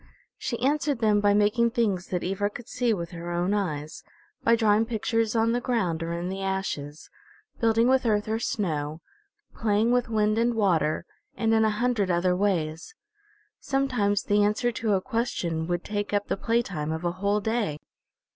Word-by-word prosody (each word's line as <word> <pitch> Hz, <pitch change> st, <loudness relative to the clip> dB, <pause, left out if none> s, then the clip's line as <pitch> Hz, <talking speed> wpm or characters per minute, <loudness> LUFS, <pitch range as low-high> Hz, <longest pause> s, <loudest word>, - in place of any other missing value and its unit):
She 235 Hz, -, -3 dB
answered 290 Hz, +1 st, +1 dB
them 215 Hz, -2 st, +2 dB
by 205 Hz, 0 st, +4 dB
making 210 Hz, +3 st, +3 dB
things 210 Hz, -6 st, 0 dB
that 180 Hz, -2 st, -2 dB
Ivra 195 Hz, +2 st, -1 dB
could 230 Hz, +2 st, -10 dB
see 245 Hz, -2 st, 0 dB
with 170 Hz, -5 st, -3 dB
her 170 Hz, 0 st, -7 dB
own 175 Hz, +3 st, 0 dB
eyes, 155 Hz, -7 st, -3 dB, 0.4 s
by 230 Hz, -, +5 dB
drawing 220 Hz, -1 st, +3 dB
pictures 225 Hz, 0 st, 0 dB
on 225 Hz, 0 st, +3 dB
the 245 Hz, +1 st, 0 dB
ground 185 Hz, -10 st, 0 dB
or 165 Hz, 0 st, -3 dB
in 170 Hz, +1 st, -3 dB
the 190 Hz, +1 st, -4 dB
ashes, 190 Hz, -6 st, -4 dB, 0.5 s
building 230 Hz, 0 st, +3 dB
with 265 Hz, 0 st, +3 dB
earth 210 Hz, -1 st, +1 dB
or 220 Hz, +1 st, -1 dB
snow, 155 Hz, -9 st, -2 dB, 0.5 s
playing 220 Hz, +1 st, +1 dB
with 245 Hz, -1 st, +1 dB
wind 215 Hz, 0 st, +2 dB
and 235 Hz, 0 st, +2 dB
water, 170 Hz, -7 st, +1 dB, 0.3 s
and 225 Hz, -1 st, +1 dB
in 220 Hz, 0 st, +4 dB
a 220 Hz, -, +3 dB
hundred 215 Hz, -2 st, 0 dB
other 180 Hz, +1 st, +2 dB
ways. 180 Hz, -, -1 dB, 0.6 s
Sometimes 255 Hz, -8 st, 0 dB
the 205 Hz, 0 st, +2 dB
answer 210 Hz, +4 st, +2 dB
to 225 Hz, -2 st, -1 dB
a 190 Hz, -, +2 dB
question 185 Hz, -9 st, -2 dB
would 175 Hz, 0 st, -1 dB
take 205 Hz, 0 st, -3 dB
up 205 Hz, 0 st, 0 dB
the -, -, +1 dB
playtime 195 Hz, -9 st, -1 dB
of 160 Hz, +1 st, -4 dB
a 175 Hz, -, +1 dB
whole 205 Hz, +1 st, +2 dB
day. 215 Hz, -8 st, -1 dB
205 Hz, 180 wpm, -26 LUFS, 180-230 Hz, 0.6 s, by